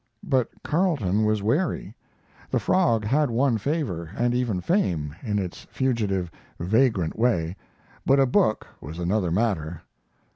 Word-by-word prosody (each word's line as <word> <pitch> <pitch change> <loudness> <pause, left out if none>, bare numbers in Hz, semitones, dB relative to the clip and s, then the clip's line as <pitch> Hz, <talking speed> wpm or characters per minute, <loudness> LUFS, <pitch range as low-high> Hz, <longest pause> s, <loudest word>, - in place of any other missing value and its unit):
But 130 -4 +1
Carleton 140 - +1
was 105 -1 +1
wary; 145 - 0 0.6
the - - +1
"Frog" 115 - +2
had 145 +5 +2
won 120 0 +2
favor, 110 - -2
and 120 0 +1
even 120 -6 0
fame, 85 - 0
in 105 -4 -1
its 95 -3 -5
fugitive, 105 -9 -1 0.3
vagrant 105 -2 +1
way, 95 -8 +1 0.5
but 135 +1 +4
a 135 - +5
book 110 -3 +2 0.2
was 80 +4 -8
another 90 +1 0
matter. 85 -5 -1
110 Hz, 135 wpm, -25 LUFS, 90-130 Hz, 0.6 s, a